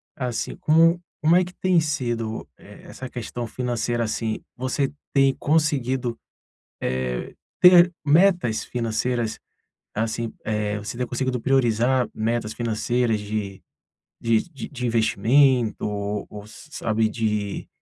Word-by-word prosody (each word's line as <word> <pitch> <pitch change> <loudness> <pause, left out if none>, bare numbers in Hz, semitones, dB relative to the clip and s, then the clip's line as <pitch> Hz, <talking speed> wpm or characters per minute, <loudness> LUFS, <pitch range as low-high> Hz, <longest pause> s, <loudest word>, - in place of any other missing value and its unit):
assim, 125 -5 -3
como 165 +2 +4 0.2
como 160 +3 +4
é 185 - +4
que 180 - -11
tem 185 -2 +2
sido, 120 - -2
eh, - - -15
essa 130 -1 -8
questão 120 0 -5
financeira, 120 0 -1
assim? 110 0 -2 0.2
Você 130 +2 -1 0.2
tem 135 -1 +4
conseguido, 135 -5 0 0.6
eh 65 -1 -2 0.3
ter 180 -1 +8
metas 170 - +3
financeiras, 115 -1 -2 0.6
assim, 115 +1 -2
eh, 105 -1 -1
você 105 +3 -6
ter 125 - -1
conseguido 130 +1 -1
priorizar 125 0 +2
metas 110 0 -1
financeiras 115 0 0
de 105 -2 -4 0.6
de 115 -1 +2
de 130 -3 -5
investimento 120 +1 +3
ou 105 0 -3
ou 105 - -8
ou - - -13
s 110 +8 -14
sabe 110 -3 0
de 105 -3 -2
120 Hz, 125 wpm, -24 LUFS, 110-135 Hz, 0.6 s, ter